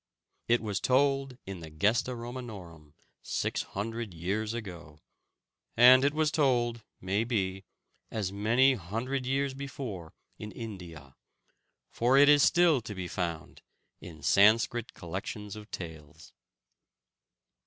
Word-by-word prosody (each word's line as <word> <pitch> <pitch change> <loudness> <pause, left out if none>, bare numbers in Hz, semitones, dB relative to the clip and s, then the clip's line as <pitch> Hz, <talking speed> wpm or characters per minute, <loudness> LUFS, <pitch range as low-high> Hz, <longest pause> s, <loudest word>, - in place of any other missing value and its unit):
It 120 0 +3
was 105 -3 -2
told 135 +1 +1
in 95 -2 -7
the 80 -1 -9
Gesta 105 +10 0
Romanorum 105 - -9 0.3
six - - -2
hundred 110 -1 -5
years 100 +6 -2
ago, 85 -10 -8 0.8
and 125 +2 +8
it 140 +1 +1
was 155 -1 +1
told, 120 -6 +1 0.2
may 100 +4 0
be, 95 -5 -2 0.4
as 100 -4 -3
many 115 +7 +3
hundred 125 +6 -4
years 135 +1 0
before 130 - -7 0.2
in 105 0 -7
India, 85 - -9 0.8
for 125 +3 +2
it 145 +1 +7
is 145 -1 +6
still 170 -4 +4
to 105 -2 -8
be 95 -1 -5
found 85 -3 -5 0.4
in 80 -4 -12
Sanskrit 110 +6 +3
collections 100 +4 -6
of 105 0 -11
tales. 80 -4 -9
110 Hz, 120 wpm, -29 LUFS, 90-125 Hz, 0.8 s, and